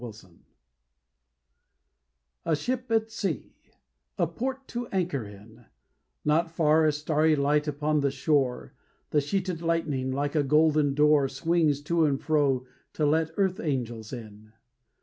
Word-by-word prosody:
THE 125 Hz, -, -6 dB, 0.2 s
BRIDE 90 Hz, -2 st, -22 dB, 2.0 s
A 165 Hz, -2 st, +1 dB
ship 250 Hz, -, -3 dB
at 225 Hz, 0 st, +1 dB
sea; 195 Hz, -, -3 dB, 0.6 s
a -, -, +2 dB
port 260 Hz, -, -4 dB
to 240 Hz, 0 st, -4 dB
anchor 175 Hz, -, -1 dB
in; 105 Hz, +3 st, -14 dB, 0.6 s
Not 165 Hz, +3 st, +2 dB
far 160 Hz, -1 st, +3 dB
a -, -, +4 dB
starry 155 Hz, +1 st, +1 dB
light 150 Hz, +1 st, +1 dB
upon 150 Hz, +1 st, 0 dB
the 140 Hz, -1 st, +1 dB
shore. 135 Hz, -1 st, 0 dB, 0.4 s
The 150 Hz, -, +3 dB
sheeted 180 Hz, +3 st, -2 dB
lightning, 160 Hz, -6 st, -1 dB
like 140 Hz, +2 st, -2 dB
a 155 Hz, -, +2 dB
golden 150 Hz, 0 st, +3 dB
door, 150 Hz, -2 st, +4 dB
Swings 150 Hz, 0 st, +1 dB
to 165 Hz, +1 st, +2 dB
and 140 Hz, -2 st, +1 dB
fro 140 Hz, -5 st, +1 dB, 0.3 s
to 155 Hz, -, 0 dB
let 160 Hz, +2 st, +2 dB
earth 195 Hz, 0 st, +1 dB
angels 120 Hz, -, -3 dB
in. 110 Hz, -3 st, -10 dB
150 Hz, 140 wpm, -27 LUFS, 135-165 Hz, 2.0 s, a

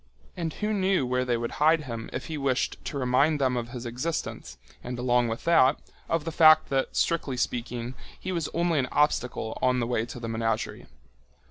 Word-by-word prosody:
And 165 Hz, -3 st, -3 dB
who 215 Hz, 0 st, -2 dB
knew 190 Hz, -7 st, +2 dB
where 125 Hz, 0 st, 0 dB
they 120 Hz, -2 st, +1 dB
would 115 Hz, 0 st, -3 dB
hide 160 Hz, +1 st, +5 dB
him 115 Hz, -4 st, -6 dB
if -, -, -5 dB
he 160 Hz, -, -5 dB
wished 135 Hz, -3 st, -1 dB
to 145 Hz, -, -4 dB
remind 135 Hz, +4 st, +2 dB
them 130 Hz, -2 st, +1 dB
of 120 Hz, -1 st, -3 dB
his 120 Hz, 0 st, -7 dB
existence 120 Hz, -, -4 dB, 0.3 s
and, 125 Hz, 0 st, -5 dB
along 125 Hz, -1 st, +2 dB
with 115 Hz, 0 st, -4 dB
that, 155 Hz, -5 st, +5 dB, 0.3 s
of 165 Hz, -2 st, 0 dB
the 165 Hz, -, -2 dB
fact 155 Hz, -1 st, +6 dB
that, 135 Hz, -1 st, -1 dB
strictly 150 Hz, -6 st, 0 dB
speaking, 120 Hz, 0 st, -3 dB, 0.3 s
he 185 Hz, -, -4 dB
was 170 Hz, -3 st, -2 dB
only 170 Hz, -2 st, +1 dB
an 130 Hz, -, 0 dB
obstacle 125 Hz, -6 st, 0 dB
on 125 Hz, 0 st, +2 dB
the 120 Hz, -, 0 dB
way 115 Hz, -1 st, -1 dB
to 120 Hz, -, -8 dB
the 115 Hz, -, -5 dB
menagerie. 115 Hz, -1 st, -2 dB
130 Hz, 200 wpm, -27 LUFS, 120-155 Hz, 0.3 s, fact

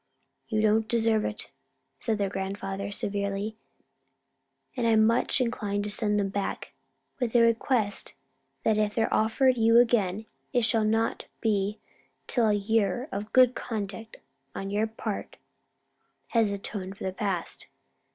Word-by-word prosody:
"You 215 Hz, -1 st, 0 dB
don't 220 Hz, +1 st, +3 dB
deserve 225 Hz, -2 st, +2 dB
it," -, -, -5 dB, 0.5 s
said 225 Hz, -2 st, 0 dB
their 200 Hz, -1 st, 0 dB
grandfather, 195 Hz, 0 st, -4 dB
severely, 200 Hz, +1 st, -2 dB, 1.2 s
"and 240 Hz, -3 st, 0 dB
I'm 220 Hz, -1 st, +5 dB
much 230 Hz, +4 st, +2 dB
inclined 210 Hz, -5 st, -1 dB
to 210 Hz, -, -4 dB
send 210 Hz, -1 st, +2 dB
them 195 Hz, -1 st, 0 dB
back, 195 Hz, 0 st, -4 dB, 0.5 s
with 245 Hz, -2 st, -2 dB
a 240 Hz, -, +7 dB
request 230 Hz, -2 st, +1 dB, 0.5 s
that 215 Hz, -1 st, +2 dB
if 210 Hz, -1 st, 0 dB
they're 225 Hz, -1 st, +1 dB
offered 245 Hz, +3 st, +3 dB
you 225 Hz, +1 st, +5 dB
again 220 Hz, -4 st, +3 dB, 0.3 s
it 245 Hz, -, +3 dB
shall 225 Hz, -1 st, +2 dB
not 225 Hz, +1 st, 0 dB
be 210 Hz, -2 st, 0 dB, 0.5 s
till 235 Hz, -3 st, +2 dB
a -, -, +3 dB
year 220 Hz, +4 st, 0 dB
of 210 Hz, +2 st, -5 dB
good 255 Hz, -1 st, +6 dB
conduct 215 Hz, -2 st, -5 dB, 0.4 s
on 195 Hz, 0 st, -4 dB
your 210 Hz, +2 st, +1 dB
part 220 Hz, -1 st, -5 dB, 0.9 s
has 225 Hz, -3 st, +2 dB
atoned 195 Hz, -1 st, -5 dB
for -, -, -8 dB
the 190 Hz, -, -2 dB
past." 190 Hz, -3 st, -3 dB
215 Hz, 140 wpm, -27 LUFS, 200-230 Hz, 1.2 s, a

